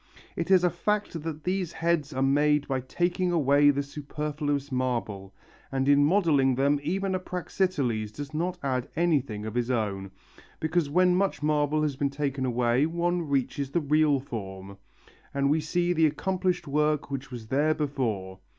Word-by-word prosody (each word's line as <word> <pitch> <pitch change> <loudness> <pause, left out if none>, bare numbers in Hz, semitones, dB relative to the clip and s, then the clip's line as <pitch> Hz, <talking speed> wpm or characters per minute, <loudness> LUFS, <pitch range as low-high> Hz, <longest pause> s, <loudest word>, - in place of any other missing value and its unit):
It 170 - -3
is 185 -2 +5
a 180 - +4
fact 210 -6 -1
that 155 -1 -6
these 185 -2 -1
heads 165 -3 0
are 130 -1 -1
made 145 +2 +3
by 135 -1 0
taking 175 +7 -1
away 145 -3 +4
the 140 0 +1
superfluous 145 0 -3
marble, 120 -7 -2 0.4
and 135 0 0
in 145 0 +5
modelling 145 -6 +3
them 140 +2 +2
even 190 +6 -1
a 185 - 0
Praxiteles 165 - -2
does 145 +6 -8
not 175 +4 -2
add 130 -1 -1
anything 140 -11 0
of 110 - -5
his 120 0 -1
own, 100 -5 -1 0.5
because 160 -1 0
when 180 +4 +4
much 195 -5 0
marble 150 0 +1
has 145 -3 -1
been 140 +1 0
taken 140 -2 -2
away 125 +3 +2
one 170 0 -1
reaches 140 0 -1
the 160 - +1
real 150 -1 +3
form, 100 -6 -7 0.6
and 140 0 +2
we 155 +1 +2
see 175 +3 0
the 160 -2 +4
accomplished 180 +2 -1
work 150 0 0
which 135 0 -4
was 120 -4 -9
there 150 +3 +2
before. 110 -11 -2
145 Hz, 170 wpm, -27 LUFS, 130-165 Hz, 0.6 s, is